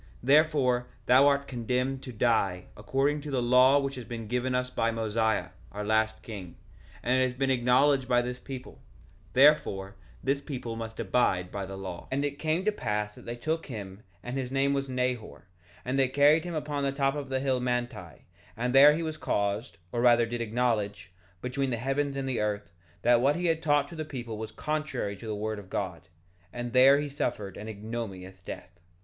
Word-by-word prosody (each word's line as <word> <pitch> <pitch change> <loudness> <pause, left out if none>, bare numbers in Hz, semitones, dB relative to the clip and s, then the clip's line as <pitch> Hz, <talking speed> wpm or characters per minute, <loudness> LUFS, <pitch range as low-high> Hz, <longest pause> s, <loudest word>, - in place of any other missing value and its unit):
1:14 - - -25 0.2
Therefore 135 -3 +3 0.2
thou 130 +3 +6
art 140 0 +2
condemned 125 +2 -1
to 130 - -8
die, 105 -6 +1
according 135 +8 0
to 150 - -7
the 135 -2 0
law 125 +3 +5
which 140 -1 -1
has 125 -2 -6
been 115 -1 -6
given 125 +2 -1
us 125 0 -1
by 115 -2 +1
Mosiah, 110 -1 0 0.2
our 105 +1 -5
last 110 +1 +1
king; 95 -6 -8 0.5
and 130 +1 +2
it - - +4
has 125 -1 -3
been 135 0 +1
acknowledged 130 +2 +3
by 120 -1 +4
this 125 0 -5
people; 130 -2 -9 0.5
therefore 115 -9 +4 0.3
this 140 +1 +1
people 125 -6 -5
must 115 0 -7
abide 95 -4 +1
by 100 -1 -4
the 95 0 -7
law. 95 -3 -7
1:15 - - -22
And 140 +2 0
it 145 0 -4
came 160 +4 0
to 215 - +3
pass 105 - -2
that - - -14
they 120 - -3
took 155 +7 -2
him; 100 -6 -7 0.2
and 125 +2 -3
his 130 -2 -3
name 135 +1 +1
was 135 -1 -2
Nehor; 125 -3 -2 0.4
and 130 +2 0
they 135 - +4
carried 145 +5 +4
him 175 -2 -4
upon 150 -2 -2
the 140 - +1
top 135 0 +1
of 145 -2 -5
the 130 0 0
hill 130 -1 +1
Manti, 120 -8 -3 0.3
and 125 +2 -1
there 145 +2 +8
he 165 - -2
was 155 -1 -4
caused, 100 +3 -1
or 120 - -1
rather 120 -1 +5
did 120 +1 -4
acknowledge, 110 -5 -1 0.3
between 135 +2 -1
the 120 - -1
heavens 135 +3 -1
and 135 -1 -2
the 130 -3 -1
earth, 105 -4 -2 0.3
that 120 0 +5
what 140 +3 +3
he 175 +1 -2
had 165 -1 +1
taught 145 -2 +2
to 170 - -9
the 155 - -3
people 120 -7 -6
was 110 0 -5
contrary 155 -10 -3
to 115 - -9
the 110 - -2
word 110 0 -3
of 95 -2 -13
God; 95 -4 -4 0.4
and 120 0 -5
there 135 +2 +7
he 145 - -2
suffered 110 -8 -3
an 105 - -8
ignominious 100 -4 -6
death. 90 0 -9
125 Hz, 205 wpm, -28 LUFS, 110-140 Hz, 0.5 s, there